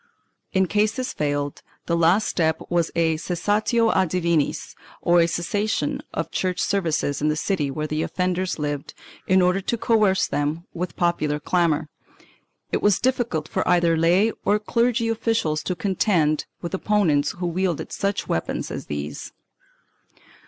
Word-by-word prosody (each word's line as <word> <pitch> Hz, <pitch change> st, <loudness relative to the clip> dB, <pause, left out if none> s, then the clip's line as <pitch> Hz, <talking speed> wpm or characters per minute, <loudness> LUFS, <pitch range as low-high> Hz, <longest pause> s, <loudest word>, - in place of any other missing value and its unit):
In 190 Hz, 0 st, +3 dB
case 210 Hz, +3 st, +1 dB
this 255 Hz, +1 st, -3 dB
failed, 145 Hz, -1 st, -2 dB, 0.2 s
the 170 Hz, -, 0 dB
last 170 Hz, +6 st, +3 dB
step 160 Hz, -2 st, +1 dB
was 170 Hz, -2 st, +2 dB
a 160 Hz, -1 st, +2 dB
cessatio 210 Hz, +7 st, +1 dB
a 190 Hz, -1 st, +2 dB
dimniSj 170 Hz, -3 st, 0 dB, 0.3 s
or 170 Hz, -1 st, +4 dB
cessation 200 Hz, +6 st, -1 dB
of -, -, -3 dB
church 185 Hz, -1 st, -1 dB
services 160 Hz, -7 st, 0 dB
in 150 Hz, -, +2 dB
the 150 Hz, -, +1 dB
city 155 Hz, -2 st, -1 dB
where 155 Hz, +3 st, -3 dB
the 155 Hz, 0 st, -2 dB
offenders 185 Hz, +1 st, -1 dB
lived, 145 Hz, -2 st, -4 dB, 0.3 s
in 185 Hz, 0 st, +4 dB
order 180 Hz, +2 st, +2 dB
to 235 Hz, +5 st, -1 dB
coerce 215 Hz, -4 st, +3 dB
them 150 Hz, +4 st, -2 dB
with 175 Hz, 0 st, -4 dB
popular 155 Hz, -4 st, 0 dB
clamor.1 160 Hz, -1 st, +1 dB, 0.8 s
It -, -, 0 dB
was 205 Hz, -2 st, +4 dB
difficult 235 Hz, -11 st, 0 dB
for 185 Hz, -, -2 dB
either 175 Hz, -2 st, +3 dB
lay 175 Hz, +7 st, +3 dB
or 205 Hz, -, +3 dB
clerical 230 Hz, +2 st, +1 dB
officials 225 Hz, -9 st, 0 dB
to 180 Hz, -, -3 dB
contend 175 Hz, -5 st, +1 dB, 0.2 s
with 170 Hz, -, -4 dB
opponents 180 Hz, -8 st, +1 dB
who 180 Hz, -, -5 dB
wielded 175 Hz, -1 st, -1 dB
such 200 Hz, 0 st, -2 dB
weapons 80 Hz, -, -2 dB
as -, -, -6 dB
these. 75 Hz, 0 st, -5 dB
175 Hz, 150 wpm, -23 LUFS, 155-200 Hz, 0.8 s, or